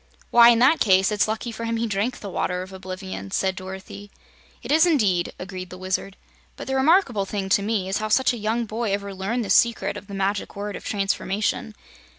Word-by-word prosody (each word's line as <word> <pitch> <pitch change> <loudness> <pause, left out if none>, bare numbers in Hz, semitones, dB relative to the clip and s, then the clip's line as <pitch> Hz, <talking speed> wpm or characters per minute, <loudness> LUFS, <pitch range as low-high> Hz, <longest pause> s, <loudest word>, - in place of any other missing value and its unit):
"Why, 235 0 +8
in 235 - +5
that 260 +7 +4
case, 190 -1 +4
it's 210 0 +2
lucky 220 +2 -3
for 230 +1 -6
him 230 0 -1
he 230 - -1
drank 215 +3 -2
the 200 - -6
Water 180 0 -2
of 190 +1 -12
Oblivion," 185 - -7
said 190 - 0
Dorothy. 190 +2 -9 0.5
"It - - -4
is 320 +3 +5
indeed," 200 - +2
agreed 185 0 -7
the 185 - -9
Wizard. 185 +1 -3 0.4
"But - - -8
the 265 - -3
remarkable 265 - +3
thing, 195 -2 -3
to 200 - +3
me, 205 -2 -1
is 195 - -1
how 215 - -2
such 255 +4 +3
a - - -4
young 225 +2 -1
boy 220 -1 -2
ever 200 0 -3
learned 210 +5 -2
the - - -2
secret 235 -1 +3
of 200 - -11
the 200 - -7
Magic 195 +1 -2
Word 205 0 -5
of - - -8
Transformation. 205 +1 -1
205 Hz, 215 wpm, -23 LUFS, 190-230 Hz, 0.5 s, Why